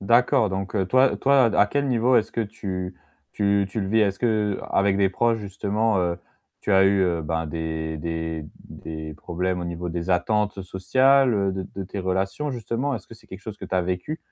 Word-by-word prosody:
D'accord, 115 0 +3
donc 95 +1 -3 0.2
toi 130 +3 +4
toi, 135 -1 +4
à 105 - +6
quel 140 +6 -1
niveau 125 0 +3
est-ce 110 0 +1
que 115 - -1
tu 95 -4 -4 0.4
tu 100 -1 +2
tu 110 - -2
le 95 - -2
vis? 110 +2 +3
Est-ce 100 -2 +1
qu'avec 105 -3 +1
des 100 -1 +3
proches 115 +4 +1
justement, 105 +1 0
heu, 85 -1 -1 0.4
tu 105 - -1
as 95 0 +6
eu, 100 0 +4
heu, 85 -3 0
ben, 80 +1 -2
des 80 0 -3
des 80 0 -3 0.2
des 80 -1 -7
problèmes 90 +4 -2
au - - -4
niveau 85 0 -4
des 85 +1 -3
attentes 105 +3 +1
sociales, 130 +8 +3
heu, 100 -2 +1
de 95 0 -3
de 100 - -3
tes 100 +2 -5
relations 95 +10 -1
justement? 125 +3 -2
Est-ce 105 -6 -7
que - - -12
c'est 110 - -20
quelque 95 - -9
chose 105 +1 -8
que - - -8
tu - - -4
as 90 - +2
vécu? 90 - -3
95 Hz, 205 wpm, -24 LUFS, 90-110 Hz, 0.4 s, à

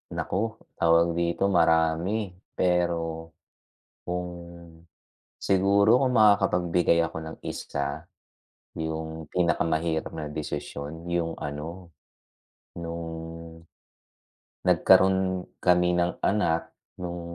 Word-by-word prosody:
Naku! 110 +4 -2 0.2
tawag 85 0 +4
dito? 85 +3 +1
Marami, 85 +4 +2 0.2
pero, 85 -2 0 0.8
kung 90 0 -3 1.1
siguro 100 +4 +3
kung 130 -1 +1
makakapagbigay 90 -6 +4
ako 85 - -4
ng 80 - -7
isa? 70 +3 -4 0.7
'Yung 80 0 -4
pinakamahirap 80 -2 0
na 80 -2 -5
desisyon 75 +2 -6
'yung 85 -1 -1
ano? 80 +5 -6 0.9
No'ng 85 0 -5 1.6
nag-karoon 95 -1 +4 0.2
kami 90 -1 +4
ng 90 0 0
anak 85 -5 +1 0.3
nu'ng 85 -1 -5
85 Hz, 85 wpm, -26 LUFS, 80-90 Hz, 1.6 s, tawag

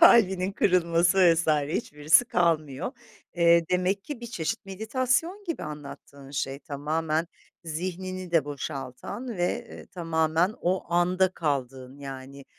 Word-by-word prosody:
kalbinin 195 - +6
kırılması 175 -1 +3 0.2
vs. 165 0 -1
hiçbirisi 150 +4 +3
kalmıyor. 165 - 0 0.4
Eee, 170 -1 +5
demek 185 +2 +1
ki 290 -5 -6
bir 235 - -6
çeşit 215 0 -3
meditasyon 255 - -1
gibi 335 -4 -4
anlattığın 140 -2 -9
şey; 135 -1 -2
tamamen 155 +2 -1 0.4
zihnini 185 +3 -4
de 165 -4 +3
boşaltan 145 - -6
ve, 175 0 -1
eee, - - -11
tamamen 165 +2 +1
o 180 -1 -1
anda 180 +2 +3
kaldığın, 135 -5 -3
yani 135 0 -8
170 Hz, 120 wpm, -27 LUFS, 145-190 Hz, 0.4 s, kalbinin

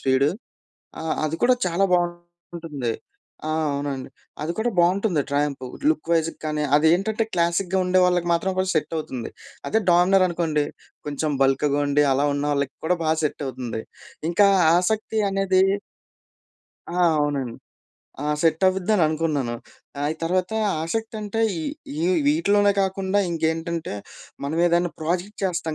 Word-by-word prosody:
Speed. 135 +2 +3 0.7
ఆహ్, 160 - -1
అది 160 - -3
కూడా 250 +1 +5
చాలా 180 +3 +1
బావుంటుంది. 175 -6 -3 0.6
ఆ! - - -1 0.2
అవునండి. 140 -2 -3 0.3
అది 160 - -2
కూడా 235 +2 +1
బావుంటుంది 180 -1 +3
ట్రయంఫ్. 140 -2 0 0.3
లుక్ 155 +1 -2
వైజ్‌గా 165 0 0
గానీ, 150 -1 -1
అదేంటంటే 190 +8 +2
క్లాసిక్‌గా 175 +2 +1
ఉండే 185 +1 +3
వాళ్ళకి 175 -1 +1
మాత్రం 180 +3 +1
కొంచెం 185 0 +1
సెట‌వుతుంది. 150 -6 -3 0.4
అదే! 220 - +2
డామినరనుకోండి, 175 -4 +3 0.4
కొంచెం 150 +1 -2
బల్క్‌గా 140 +2 +2
ఉండి 145 +1 +3
అలా 140 +2 +2
ఉన్నోళ్ళకి 145 -1 -1
కూడా 180 - +2
బా 155 - +3
సెట్ 150 0 -2
అవుతుంది. 120 -4 -5 0.5
ఇంకా 200 +3 +5 0.3
ఆసక్తి 215 +4 0
అనేది 195 -1 +2 1.3
ఆ! - - 0 0.2
అవునండి. 140 -5 -1 0.7
ఆ! 150 - -2 0.2
సెట్ 165 +1 +2
అవిద్దననుకున్నాను. 160 - 0 0.4
ఆ! - - -4
అయి 155 - -2
తర్వాత 180 +3 0 0.3
ఆసక్తి 220 +7 -3
అంటే 210 +2 -3 0.2
ఈ, - - -3 0.4
ఈ - - -4 0.3
వీటిలోనే 205 -10 +3
కాకుండా 190 +1 0
ఇంకేంటంటే 165 - -2 0.5
మనమేదైనా 170 +3 +2
ప్రాజెక్ట్ 180 +6 -2
చేస్తాం 170 -4 -1
170 Hz, 125 wpm, -23 LUFS, 150-185 Hz, 1.3 s, కూడా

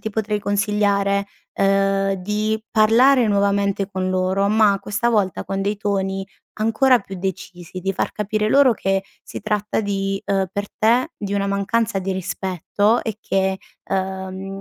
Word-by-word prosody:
ti - - -3
potrei 210 0 -1
consigliare, 200 -1 +1 0.3
ehm, 195 0 +2
di 210 +3 -2
parlare 235 +4 +5
nuovamente 200 -1 +1
con 185 -1 -2
loro, 185 +1 +1
ma 210 -2 +4
questa 205 +4 -1
volta 205 -6 0
con 195 0 -3
dei 205 +1 -1
toni 195 -1 -2 0.4
ancora 240 +4 +4
più 195 -1 -9
decisi. 185 -1 -6
Di 195 +2 -1
far - - -2
capire 210 +1 -1
loro 275 +1 +5
che 195 -2 -1 0.2
si - - -7
tratta 210 0 -1
di, 195 -1 -2
uhm, 195 -1 +1
per 200 +1 -3
te, 240 +7 +3
di 200 -1 -4
una 200 0 0
mancanza 200 +1 0
di 190 0 -2
rispetto 190 +4 0
e 220 -2 -4
che, 190 -2 0 0.3
uhm, 190 0 -3
200 Hz, 150 wpm, -21 LUFS, 195-215 Hz, 0.4 s, parlare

